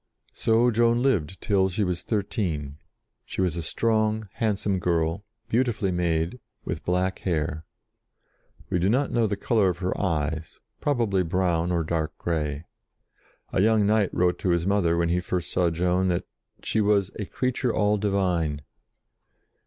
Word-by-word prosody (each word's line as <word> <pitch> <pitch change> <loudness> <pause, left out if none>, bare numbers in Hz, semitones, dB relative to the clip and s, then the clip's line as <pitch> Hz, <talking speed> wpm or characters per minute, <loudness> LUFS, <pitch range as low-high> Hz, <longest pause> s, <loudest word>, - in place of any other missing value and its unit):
So 115 +2 +3
Joan 120 +1 +3
lived 95 - 0
till 95 -2 +2
she 100 +3 -1
was 90 -3 -1
thirteen. 90 - -2 0.5
She - - -8
was 90 -4 +1
a 85 - -2
strong, 110 +4 0
handsome 100 -3 0
girl, 85 +2 0 0.2
beautifully 115 -5 +1
made, 85 +4 0 0.3
with - - -4
black 90 +1 0
hair. 80 -3 -2 1.1
We 90 - +2
do 90 +3 +2
not 130 +5 +1
know 115 -2 +2
the 100 -1 -2
colour 105 -2 +2
of 90 - -2
her 90 0 -2
eyes, 80 -3 -2 0.2
probably 115 -9 +1
brown 90 -1 0
or 85 -2 +1
dark 80 -1 -2
grey. 75 -2 -2 0.9
A - - +2
young 110 0 +4
knight 105 -1 +2
wrote 90 0 +1
to 95 - -1
his 85 -1 +2
mother, 95 -4 +2
when 85 0 +1
he 90 +1 +2
first 90 -1 -3
saw 90 -2 +2
Joan, 90 +3 +1
that 90 -1 0 0.4
she 110 - +1
was 100 -2 +2
"a 105 - -2
creature 125 +3 -1
all 105 -1 +2
divine." 90 -8 0
95 Hz, 155 wpm, -26 LUFS, 85-105 Hz, 1.1 s, young